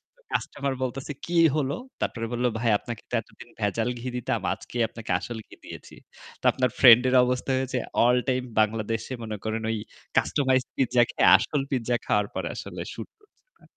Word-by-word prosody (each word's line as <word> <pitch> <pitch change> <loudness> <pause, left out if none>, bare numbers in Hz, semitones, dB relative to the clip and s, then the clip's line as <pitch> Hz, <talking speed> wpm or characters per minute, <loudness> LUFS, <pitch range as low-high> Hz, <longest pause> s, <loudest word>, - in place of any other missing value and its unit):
তো - - -32
কাস্টমার 140 -1 -2
বলতেছে 130 +3 -4
"কী 175 - -4 0.2
হলো?" 140 -2 0 0.3
তারপরে 115 -1 -2
বলল 120 +1 -1
"ভাই 115 - +1
আপনাকে 120 -2 -7
তো - - -15
এতদিন 120 +2 -16
ভেজাল 110 +3 0
ঘি 125 - -6
দিতাম। 120 - -1
আজকেই 120 - -5
আপনাকে 115 -4 -7
আসল 115 +5 -6
ঘি - - -14
দিয়েছি।" - - -10 0.5
তো - - -49
আপনার 130 -1 +1
ফ্রেন্ড 125 -3 +9
এর 130 - +2
অবস্থা 125 +2 -1
হয়েছে 130 -1 -2 0.3
আল 125 +1 +5
টাইম 130 -1 +1 0.2
বাংলাদেশে 110 +3 0
মনে 110 -1 -5
করেন 110 0 -2
ওই 110 - -1 0.4
customized 130 - +2
pizza 125 -2 +3
খেয়ে - - +1
আসল 145 -2 -1
পিজ্জা 120 -2 0
খাওয়ার 105 -1 +1
পর - - -3
আসলে - - -7
শ্যুট - - -8
করছে 420 +3 -32
না। - - -26
125 Hz, 185 wpm, -26 LUFS, 115-130 Hz, 0.5 s, ফ্রেন্ড